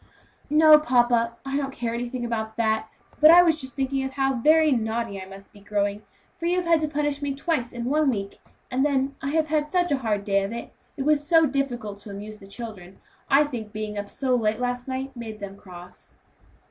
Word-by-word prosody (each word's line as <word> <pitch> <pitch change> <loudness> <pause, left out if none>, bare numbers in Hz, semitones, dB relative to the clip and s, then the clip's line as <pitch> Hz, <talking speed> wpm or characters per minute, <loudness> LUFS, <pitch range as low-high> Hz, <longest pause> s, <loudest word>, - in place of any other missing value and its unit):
"No, 305 +1 +7
papa; 240 -4 +2
I 270 0 -3
don't 275 -1 -2
care 235 -3 -3
anything 240 +1 -4
about 220 -2 -3
that, 220 -1 0 0.3
but 305 - +8
I 350 +2 +9
was 320 -3 +2
just 260 0 -7
thinking 270 0 -1
how 270 0 0
very 310 +5 +4
naughty 225 -4 -1
I 190 - -9
must 195 +1 -13
be 205 - -15
growing; 205 0 -2 0.4
for 335 - -2
you 350 - +2
have 360 - -1
had 335 -2 +3
to 310 - 0
punish 295 -1 -1
me 280 -1 -2
twice 275 -5 -1
in 240 -1 -5
one 295 +2 +2
week; 200 -5 -4 0.3
and 260 +2 +1
then 275 -1 0
I 275 - -2
have 315 +1 0
had 300 -1 0
such 355 -2 +1
a 280 - +1
hard 210 -5 -1
day 200 -1 +2
of 195 - -4
it 235 - -7 0.2
it 270 - -2
was 295 -1 +2
so 325 -2 +5
difficult 245 -7 -3
to 205 - -12
amuse 210 +2 -8
the 195 - -14
children. 200 -4 -9 0.3
I 275 +2 +6
think 235 -8 -6
being 215 0 -5
up 205 0 -5
so 265 -2 -1
late 220 -2 +1
last 245 0 -2
night 265 +1 -4
made 225 -3 -7
them 200 -1 -7
feel 200 - -18
cross." 180 -1 -13
245 Hz, 225 wpm, -25 LUFS, 215-290 Hz, 0.4 s, I